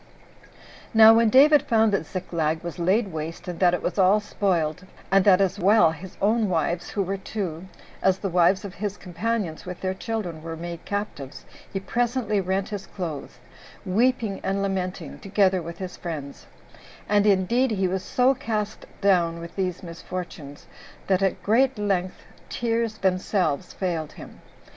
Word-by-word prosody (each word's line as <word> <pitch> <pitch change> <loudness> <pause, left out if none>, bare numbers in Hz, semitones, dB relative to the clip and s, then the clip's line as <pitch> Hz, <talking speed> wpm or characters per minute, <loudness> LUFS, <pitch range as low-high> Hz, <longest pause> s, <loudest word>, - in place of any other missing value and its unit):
6. - - -23 0.4
Now 220 0 +9
when 230 0 +4
David 290 +4 +7
found 225 -5 +2
that 190 -5 0
Ziklag 165 -4 -2
was 170 +1 -6
laid 195 +5 +2
waste, 160 +3 -6
and 175 -2 -5
that 180 -1 +4
it - - -6
was - - -2
all 195 +3 +5
spoiled, 185 -4 -1 0.2
and 195 0 +5
that 190 -2 +6
as 195 -2 +1
well 195 -2 +5
his 175 +3 -10
own 215 +1 +2
wives, 170 0 -1
who 200 - -1
were 195 +2 -3
two, 190 -4 -5 0.3
as 190 -1 +3
the 195 - -3
wives 185 +2 +3
of 195 - -7
his 205 +1 -4
companions, 190 -2 -3
with 180 -1 -8
their 185 0 -1
children, 190 -5 -4
were 165 0 -6
made 170 0 -7
captives, 200 -10 -5 0.3
he 195 - -2
presently 230 -1 0
rent 190 +2 -1
his 200 -2 -6
clothes, 160 -7 -6 0.5
weeping 220 +1 +1
and 195 +1 -1
lamenting, 190 -1 -3
together 190 -2 +2
with 170 +1 -8
his 185 -1 -7
friends; 150 -5 -7 0.6
and 205 0 +3
indeed 210 +7 +3
he 195 -4 0
was 190 +1 -2
so 255 +6 +2
cast 215 -4 -4
down 175 -4 +2
with 170 0 -9
these 185 -2 -2
misfortunes, 170 -4 -8 0.4
that 190 -1 +2
at 195 0 -1 0.3
length 190 -3 -1 0.3
tears 230 -2 -1
themselves 185 -4 0
failed 170 -5 -3
him. - - -12
190 Hz, 160 wpm, -25 LUFS, 175-210 Hz, 0.6 s, Now